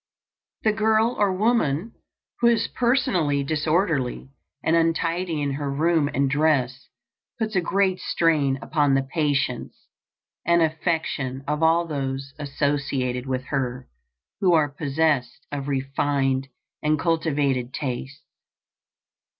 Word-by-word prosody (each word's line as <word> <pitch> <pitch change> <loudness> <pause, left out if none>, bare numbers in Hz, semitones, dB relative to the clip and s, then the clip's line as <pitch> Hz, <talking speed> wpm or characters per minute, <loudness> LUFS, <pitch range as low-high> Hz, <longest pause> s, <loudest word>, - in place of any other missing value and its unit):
The 215 - +4
girl 220 +2 +2
or 205 -2 +3
woman 215 - +1 0.5
who 235 - +4
is 230 -2 +3
personally 235 - +1
disorderly 155 -3 0 0.3
and 160 - +2
untidy 165 -1 0
in 140 - -1
her 140 0 -3
room 155 +1 +2
and 140 +1 +1
dress 135 -3 +1 0.5
puts 220 -2 -2
a 180 - +3
great 190 +1 +1
strain 150 -5 +1
upon 145 -3 +2
the 135 - +2
patience 135 -3 -2 0.5
and 170 0 +4
affection 155 -5 -1
of 150 +1 -1
all 165 +1 +4
those 135 -3 -4
associated 140 -3 -1
with 130 -1 -2
her 125 -2 -2 0.5
who 185 -3 +3
are 155 -3 +3
possessed 145 -4 0
of 140 -1 -4
refined 135 -1 0 0.3
and 155 0 +2
cultivated 145 -6 0
tastes. 135 +1 -5
150 Hz, 120 wpm, -24 LUFS, 135-170 Hz, 0.5 s, The